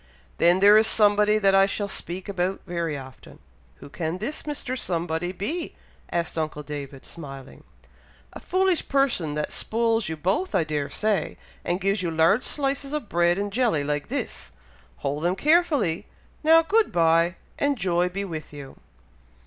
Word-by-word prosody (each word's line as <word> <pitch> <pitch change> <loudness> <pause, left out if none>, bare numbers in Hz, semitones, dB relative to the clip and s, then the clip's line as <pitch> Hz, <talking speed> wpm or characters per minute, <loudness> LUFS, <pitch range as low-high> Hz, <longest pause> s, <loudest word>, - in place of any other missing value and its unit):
"Then 175 +2 +4
there 205 +2 +8
is 220 - +4
somebody 210 0 +4
that 195 -2 +3
I 195 0 +5
shall 205 0 -2
speak 185 -1 -4
about 190 -1 -2
very 170 -4 -3
often." 130 -2 -12 0.4
"Who - - -12
can 160 +4 -4
this 235 +10 -4
Mr. 280 -3 -4
Somebody 175 -5 -2
be?" 290 - -4 0.4
asked 170 -1 -2
uncle 155 -1 -3
David, 140 -2 -7
smiling. 135 -5 -10 0.7
"A - - -8
foolish 370 -2 +1
person 240 - +1
that 150 - -2
spoils 225 -3 0
you 160 - -4
both 195 - -1
I 180 - +3
dare 150 -2 -3
say, 215 -2 -1 0.3
and 175 +1 -1
gives 195 +1 0
you 175 - -1
large 165 +8 +3
slices 275 0 -2
of 300 -8 -4
bread 175 +1 +2
and 200 0 -3
jelly 225 - +1
like 145 0 -2
this. - - -5 0.5
Hold 145 +2 -1
them 175 +2 +1
carefully! 295 - +2 0.4
Now, 325 +1 +6
good 435 +6 +2
bye, 165 +1 +3 0.2
and 285 -1 +1
joy 180 -3 +1
be 200 +2 -4
with 160 -5 -7
you." 140 -2 -10
185 Hz, 165 wpm, -25 LUFS, 160-225 Hz, 0.7 s, there